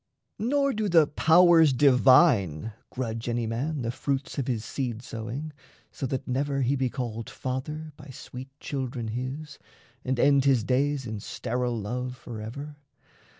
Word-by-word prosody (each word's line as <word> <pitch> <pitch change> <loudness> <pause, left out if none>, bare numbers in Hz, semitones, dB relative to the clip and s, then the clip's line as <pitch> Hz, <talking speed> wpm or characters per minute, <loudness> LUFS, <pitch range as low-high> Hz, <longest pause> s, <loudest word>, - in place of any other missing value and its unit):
Nor 275 +4 +1
do 215 -1 -1
the 165 -3 +6
powers 160 0 +5
divine 125 - +4 0.2
grudge 115 -2 -4
any 120 0 -1
man 130 +5 -2
The 115 - -1
fruits 140 +4 -3
of 135 - -2
his 115 -4 -2
seed 120 -4 -4
sowing, 120 +7 -6 0.4
so 135 - -4
that 130 0 -3
never 135 +1 0
He 130 +3 +2
be 130 -2 0
called 115 -3 -5
"father" 150 +5 -5
by 145 - -12
sweet 130 0 -9
children 130 -4 -4
his, 130 +6 -5 0.4
And 130 -1 -1
end 140 0 +4
his 130 -5 +4
days 135 +2 +1
in 110 -2 -4
sterile 120 +3 -2
love 125 +4 -4
forever. 120 +7 -7
130 Hz, 150 wpm, -27 LUFS, 120-145 Hz, 0.4 s, the